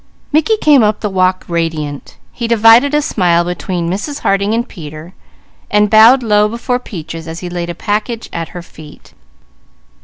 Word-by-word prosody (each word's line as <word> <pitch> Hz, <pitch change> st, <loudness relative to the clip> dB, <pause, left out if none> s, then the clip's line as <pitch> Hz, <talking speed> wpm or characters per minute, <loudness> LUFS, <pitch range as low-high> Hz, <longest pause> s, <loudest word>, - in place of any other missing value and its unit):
Mickey 315 Hz, +9 st, +2 dB
came 295 Hz, -, +4 dB
up 210 Hz, -1 st, +1 dB
the 210 Hz, -, -2 dB
walk 185 Hz, 0 st, 0 dB
radiant. 160 Hz, -4 st, -4 dB
He 235 Hz, -, -4 dB
divided 230 Hz, +5 st, +5 dB
a 300 Hz, -, +1 dB
smile 175 Hz, -, +1 dB
between 175 Hz, 0 st, -4 dB
Mrs. 210 Hz, -, -4 dB
Harding 200 Hz, +1 st, 0 dB
and 235 Hz, +1 st, -2 dB
Peter, 155 Hz, 0 st, -10 dB, 0.6 s
and 210 Hz, 0 st, +2 dB
bowed 230 Hz, +4 st, +6 dB
low 210 Hz, -1 st, +2 dB
before 240 Hz, +2 st, -2 dB
Peaches 165 Hz, -7 st, -8 dB
as 165 Hz, +1 st, -7 dB
he 180 Hz, -, -6 dB
laid 175 Hz, -1 st, -4 dB
a 175 Hz, -, -5 dB
package 215 Hz, +5 st, -3 dB
at 165 Hz, -1 st, -4 dB
her 175 Hz, -1 st, -9 dB
feet. 155 Hz, -3 st, -15 dB
200 Hz, 165 wpm, -14 LUFS, 170-230 Hz, 0.6 s, bowed